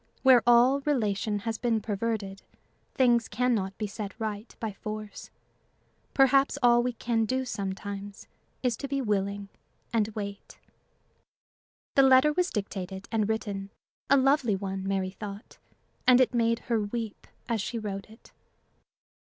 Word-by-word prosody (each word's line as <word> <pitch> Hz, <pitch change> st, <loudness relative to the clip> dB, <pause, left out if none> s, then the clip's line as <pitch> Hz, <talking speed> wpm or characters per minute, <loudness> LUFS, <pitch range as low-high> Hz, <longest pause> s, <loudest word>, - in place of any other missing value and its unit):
Where 260 Hz, -3 st, +7 dB
all 245 Hz, +3 st, +6 dB
relation 215 Hz, -7 st, 0 dB
has 225 Hz, 0 st, -3 dB
been 235 Hz, -2 st, +1 dB
perverted, 205 Hz, -2 st, -3 dB, 0.5 s
things 240 Hz, -4 st, +3 dB
can 250 Hz, +4 st, +1 dB
not 195 Hz, -3 st, -2 dB
be 215 Hz, -, -2 dB
set 205 Hz, 0 st, -7 dB
right 215 Hz, 0 st, -5 dB
by 225 Hz, -3 st, -3 dB
force. 215 Hz, +1 st, -7 dB, 0.9 s
Perhaps 275 Hz, +1 st, +4 dB
all 240 Hz, 0 st, +6 dB
we 250 Hz, 0 st, -1 dB
can 230 Hz, -1 st, 0 dB
do 260 Hz, +3 st, -1 dB
sometimes 200 Hz, -2 st, -5 dB, 0.4 s
is 245 Hz, -2 st, +1 dB
to 280 Hz, -, -5 dB
be 275 Hz, 0 st, -1 dB
willing 200 Hz, -3 st, -1 dB, 0.4 s
and 220 Hz, -3 st, +2 dB
wait. 200 Hz, -2 st, -6 dB, 1.4 s
The 275 Hz, -, +6 dB
letter 265 Hz, +3 st, +6 dB
was 360 Hz, +2 st, +1 dB
dictated 195 Hz, -2 st, -5 dB
and 220 Hz, -2 st, +1 dB
written 200 Hz, -3 st, -3 dB, 0.4 s
a 280 Hz, -, +6 dB
lovely 270 Hz, -5 st, +3 dB
one, 195 Hz, 0 st, -4 dB
Mary 190 Hz, -1 st, -1 dB
thought 200 Hz, +1 st, -9 dB, 0.5 s
and 250 Hz, 0 st, +7 dB
it 255 Hz, 0 st, +3 dB
made 230 Hz, -1 st, +2 dB
her 230 Hz, -2 st, 0 dB
weep 220 Hz, +1 st, -5 dB, 0.2 s
as 230 Hz, -3 st, 0 dB
she 235 Hz, -, -4 dB
wrote 200 Hz, -2 st, -5 dB
it. 220 Hz, +2 st, -17 dB
220 Hz, 145 wpm, -28 LUFS, 200-245 Hz, 1.4 s, Where